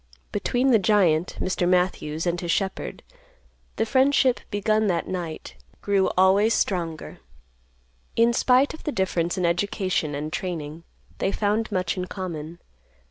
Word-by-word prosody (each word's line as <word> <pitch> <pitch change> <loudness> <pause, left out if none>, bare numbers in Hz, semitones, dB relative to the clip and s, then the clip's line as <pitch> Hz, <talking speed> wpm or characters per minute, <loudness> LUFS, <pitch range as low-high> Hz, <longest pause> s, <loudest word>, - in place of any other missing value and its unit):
Between 255 +2 +1
the 225 - +5
giant 180 -4 +2
Mr. 180 -1 0
Matthews 180 -3 0
and 175 0 -1
his 175 - -5
shepherd, 190 +2 -2 0.7
the - - 0
friendship, 260 +1 +3
begun 215 +1 +1
that 170 -3 0
night, 175 -4 -5 0.3
grew 200 -2 +1
always 195 +4 +4
stronger. 170 -5 -2 1.0
In 235 +1 +4
spite 255 +3 +3
of 315 - -11
the 300 - -2
difference 180 -5 -1
in 180 - 0
education 175 -3 0
and 150 +2 -5
training, 165 -3 -5 0.3
they 195 - 0
found 215 +2 0
much 185 -2 -1
in 180 - -2
common. 170 -4 -6
185 Hz, 135 wpm, -24 LUFS, 170-215 Hz, 1.0 s, the